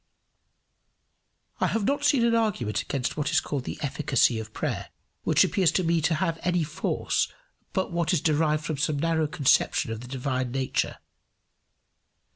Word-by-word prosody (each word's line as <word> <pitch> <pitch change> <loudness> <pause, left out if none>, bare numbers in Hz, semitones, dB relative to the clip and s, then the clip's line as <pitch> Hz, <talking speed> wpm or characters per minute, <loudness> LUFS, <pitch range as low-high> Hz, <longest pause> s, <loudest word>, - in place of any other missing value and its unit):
I - - +2
have 225 - -1
not 285 +4 0
seen 275 -5 +4
an 235 - +3
argument 205 - 0
against 130 -3 -3
what 150 -1 -1
is 160 0 +4
called 140 -4 -4
the - - -5
efficacy 135 -4 +2
of 110 0 -7
prayer - - -3 0.3
which - - +4
appears 185 -5 +2
to 185 - +1
me 165 -1 +2
to 160 +1 +2
have 165 0 -1
any 175 -1 +1
force 150 - -1 0.4
but 190 -1 -1
what 170 -2 0
is 175 - +3
derived 155 -1 +1
from 155 -2 -2
some 150 +1 0
narrow 160 0 +1
conception 140 -5 +2
of 110 0 -5
the 125 - -9
divine 130 -1 -2
nature. 135 0 -1
155 Hz, 165 wpm, -26 LUFS, 135-175 Hz, 0.4 s, seen